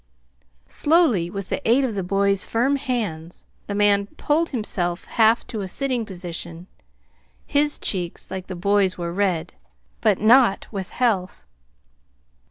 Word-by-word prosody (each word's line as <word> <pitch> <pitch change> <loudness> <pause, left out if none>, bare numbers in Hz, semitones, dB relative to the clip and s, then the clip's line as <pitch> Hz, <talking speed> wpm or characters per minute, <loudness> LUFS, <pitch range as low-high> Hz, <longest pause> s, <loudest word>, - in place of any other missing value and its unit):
Slowly, 290 - +2
with 195 0 -6
the - - -2
aid 255 +4 +4
of 250 -4 -1
the 200 - -2
boy's 195 +1 +1
firm 260 +5 +1
hands, 210 - -4 0.2
the 200 - -3
man 200 -1 +3
pulled 320 +3 +1
himself 180 -8 -2
half 225 0 +3
to 220 -4 -5
a 190 - -4
sitting 250 +2 -2
posture. 175 -2 -7 0.8
His 295 +1 +2
cheeks, 175 -3 -2
like 190 -1 -5
the 185 - -6
boy's, 200 +1 +1
were 170 -1 -4
red 180 -3 -1 0.5
but 210 -4 +2
not 230 -1 +4
with 195 -4 -5
health. 205 - -1
200 Hz, 140 wpm, -22 LUFS, 180-240 Hz, 0.8 s, aid